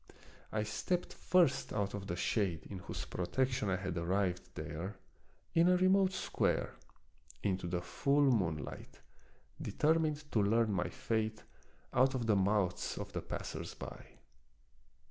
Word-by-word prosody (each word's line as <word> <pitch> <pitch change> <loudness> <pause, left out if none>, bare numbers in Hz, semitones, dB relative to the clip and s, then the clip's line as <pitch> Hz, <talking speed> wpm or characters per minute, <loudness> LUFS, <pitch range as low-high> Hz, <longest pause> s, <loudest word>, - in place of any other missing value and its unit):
I 110 -1 0
stepped 175 - -2
first 165 -8 +3
out 100 -1 -1
of 100 -1 -5
the 85 - -2
shade 90 -3 0
in 95 - -5
whose 90 - -5
protection 125 +4 0
I 95 - +2
had 90 -2 -3
arrived 90 +1 -1
there, 95 +7 -5 0.6
in 165 +1 +5
a 180 - +5
remote 190 +1 +4
square, 185 - 0 0.7
into 95 -3 0
the 90 0 -1
full 140 +9 +2
moonlight, 85 -10 -2 0.6
deter 160 +2 +2
mined 155 -2 -1
to 110 - +3
learn 110 +1 +3
my 90 -1 0
fate 110 -1 -2 0.5
out 130 +2 +4
of 120 -3 -1
the 110 -2 +4
mouths 95 -1 +1
of - - -6
the - - -2
passers - - -5
by. - - -8
105 Hz, 145 wpm, -34 LUFS, 95-135 Hz, 0.7 s, in